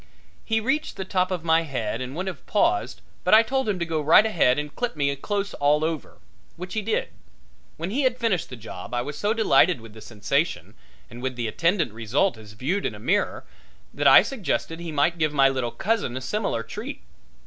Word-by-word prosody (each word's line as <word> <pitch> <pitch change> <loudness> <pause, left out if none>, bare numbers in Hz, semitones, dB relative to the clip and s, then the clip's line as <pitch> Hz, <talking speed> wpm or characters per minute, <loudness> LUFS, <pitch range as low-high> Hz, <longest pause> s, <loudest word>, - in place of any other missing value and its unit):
He 225 0 +1
reached 270 +7 -1
the 190 - -4
top 185 -1 0
of 180 -4 -3
my 165 0 +4
head 125 -7 -3
and 130 +2 -5
would 185 +3 -3
have 180 -9 -6
paused 340 - +1 0.2
but - - +6
I 225 - +7
told 265 0 -1
him 200 - 0
to 170 - -2
go 160 -2 -1
right 160 +8 +6
ahead 160 -12 +3
and 150 -1 -4
clip 245 -5 -2
me 140 -1 0
close 200 +7 -3
all 150 +2 +2
over, 160 -3 -4 0.4
which 180 +1 -7
he 220 - -1
did. 215 +2 -1 0.7
When 170 +4 -4
he 270 +6 0
had 255 -2 +1
finished 205 -9 0
the 125 - -7
job 115 -1 -8
I 120 - 0
was 145 +3 -6
so 205 - 0
delighted 185 - +4
with 115 -1 -13
the 110 - -12
sensation 130 - -2 0.3
and 120 +2 -11
with 130 0 -3
the 120 -2 -2
attendant 170 - 0
result 115 - 0
as 105 -1 -13
viewed 155 - -1
in - - -6
a - - -11
mirror - - 0 0.5
that - - +1
I - - +9
suggested 190 -9 -3
he 170 -1 -6
might 155 +3 +1
give 155 -1 +1
my 135 -2 +5
little 130 -3 -1
cousin 195 - -1
a - - -5
similar 195 - -2
treat. 215 - -7
165 Hz, 215 wpm, -24 LUFS, 130-205 Hz, 0.7 s, I